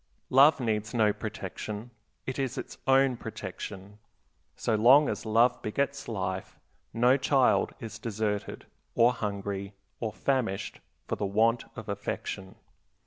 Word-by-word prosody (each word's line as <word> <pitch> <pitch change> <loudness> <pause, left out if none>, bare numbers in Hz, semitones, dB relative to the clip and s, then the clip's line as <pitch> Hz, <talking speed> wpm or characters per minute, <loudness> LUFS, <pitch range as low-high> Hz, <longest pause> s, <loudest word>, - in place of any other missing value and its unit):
Love 140 +4 +7
needs 110 -1 -1
no 110 -3 +4
protection; 105 +1 -6 0.3
it 130 +1 -4
is 130 -2 -2
its - - -6
own 135 -1 +4
protection. 105 -2 -7 0.6
So 115 - -1
long 130 +7 +6
as - - -3
love 115 +3 +3
begets 140 +5 -2
life 95 -4 -4 0.3
no 125 +3 +4
child 135 -1 +2
is 115 -1 -7
deserted, 105 -2 -3 0.3
or 120 +2 +5
hungry, 100 -3 -4 0.3
or 110 -2 -2
famished 120 -6 -1 0.3
for - - -2
the 100 - -1
want 115 +4 +2
of 110 -2 -8
affection. 100 -1 -4
110 Hz, 130 wpm, -29 LUFS, 105-125 Hz, 0.6 s, Love